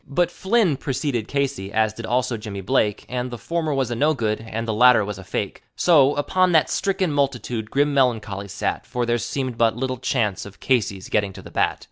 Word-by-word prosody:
But 175 +4 +1
Flynn 190 - +1
procede 130 -4 -2
Casey, 140 -9 -2
as 110 0 +1
did 115 +1 -7
also 125 0 0
Jimmy 105 -3 -6
Blake, 105 -1 0
And 125 0 -3
the 120 - -6
former 160 +7 -2
was 135 -4 0
a - - -1
no 150 +6 +2
good 110 -3 -1
and 115 +1 -5
the 110 - 0
latter 120 -1 +5
was 100 -2 -6
a - - -9
fake; - - -4
So, 145 -5 +4
upon 185 +5 +2
that 160 - +3
stricken 190 -3 0
multitude 125 -6 -1
grim 145 +2 +1
meloncholy 110 -7 0
sat, - - -3
For 125 -1 -2
there 120 0 +1
seemed 130 -1 -3
but 115 0 +3
little 130 0 -2
chance 115 -5 -1
of 100 -1 -12
Casey's 105 -7 0
getting 100 -2 0
to - - -11
the - - -12
bat. - - 0
125 Hz, 210 wpm, -22 LUFS, 110-140 Hz, -, latter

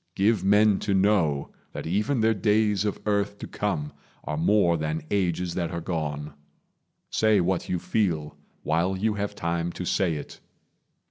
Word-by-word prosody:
Give 100 0 +2
men 105 +1 +4
to 100 -2 0
know 95 -8 +2 0.2
that - - -6
even 105 - 0
their 110 0 +4
days 105 0 +2
of 105 - -2
earth 100 -1 0
To - - -7
come 75 -8 -3 0.3
are 75 - -3
more 85 +2 +3
than 80 -1 -2
ages 90 -3 0
that 85 -3 -2
are 85 -1 -4
gone. 75 -4 -3 0.8
Say 110 -2 +3
what 90 0 0
you 90 - 0
feel, 85 -6 -1 0.3
while 85 +5 +1
you 110 +3 +1
have 105 0 -3
time 85 -2 -2
to 90 - -5
say 85 -2 +1
it. 75 - -8
95 Hz, 160 wpm, -26 LUFS, 85-105 Hz, 0.8 s, men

